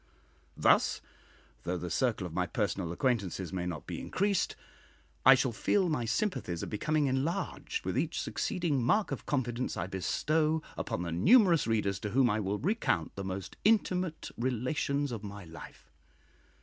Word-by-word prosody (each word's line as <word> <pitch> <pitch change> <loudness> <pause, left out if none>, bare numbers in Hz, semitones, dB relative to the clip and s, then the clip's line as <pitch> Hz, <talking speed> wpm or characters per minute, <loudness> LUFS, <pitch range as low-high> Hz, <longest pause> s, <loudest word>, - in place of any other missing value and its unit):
Thus, - - +4 0.6
though 90 +6 -2
the 90 0 -5
circle 110 0 0
of 85 - -7
my 90 0 0
personal 95 -2 -1
acquaintances 95 - -1
may 90 -1 -2
not 85 -4 -5
be - - -5
increased, 200 -1 0 0.7
I 130 - +11
shall 130 0 +1
feel 180 - +1
my 125 -7 0
sympathies 115 - -1
are - - -6
becoming 150 +8 +1
enlarged 135 +5 -2
with - - -1
each - - 0
succeeding 170 -8 -1
mark 205 - +2
of - - -5
confidence 125 -3 -1
I 95 - -1
bestow 155 - 0
upon 85 - -3
the 85 - -3
numerous 175 - +5
readers 100 -4 0
to 105 - -4
whom 125 +1 +3
I 105 - 0
will 100 0 -1
recount 145 - 0
the 100 - -4
most 95 0 -5
intimate 185 -6 +1
relations 130 +3 -1
of 110 -3 -5
my 100 -1 -7
life. 70 -6 -12
120 Hz, 160 wpm, -31 LUFS, 95-155 Hz, 0.7 s, I